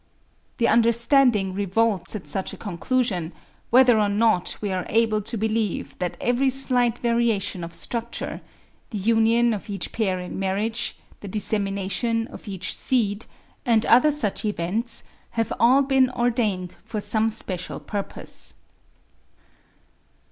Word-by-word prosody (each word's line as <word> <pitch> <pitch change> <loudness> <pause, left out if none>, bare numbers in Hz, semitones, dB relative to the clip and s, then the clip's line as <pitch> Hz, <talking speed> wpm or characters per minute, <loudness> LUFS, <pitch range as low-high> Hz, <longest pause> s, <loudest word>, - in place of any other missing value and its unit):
The 235 - +2
understanding 235 -3 +3
revolts 200 +1 +1
at 205 - -6
such 190 -2 -1
a - - -8
conclusion, 195 -3 -1 0.4
whether 245 -2 +6
or 205 -1 +2
not 210 -3 +2
we 205 -2 -3
are 185 -1 -2
able 220 -1 +2
to 225 +3 -3
believe 220 -2 -1
that 180 -1 -3
every 245 +3 +2
slight 250 -3 +2
variation 230 -6 0
of 170 - -6
structure,—the 235 +1 -6
union 230 +3 +3
of 210 0 -6
each 200 -1 -4
pair 190 -5 -1
in 180 +1 -6
marriage, 205 +4 -1 0.2
the 205 - -9
dissemination 205 +3 -1
of - - -12
each 190 -2 -4
seed,—and 225 0 -1
other 250 +6 +6
such 290 -9 -1
events, 215 +4 -1 0.3
have 225 -2 0
all 255 +5 +5
been 265 -1 +3
ordained 230 -7 -1
for 215 - -4
some 220 +2 +1
special 190 -5 -3
purpose. 205 -2 -4
220 Hz, 125 wpm, -24 LUFS, 195-235 Hz, 0.4 s, whether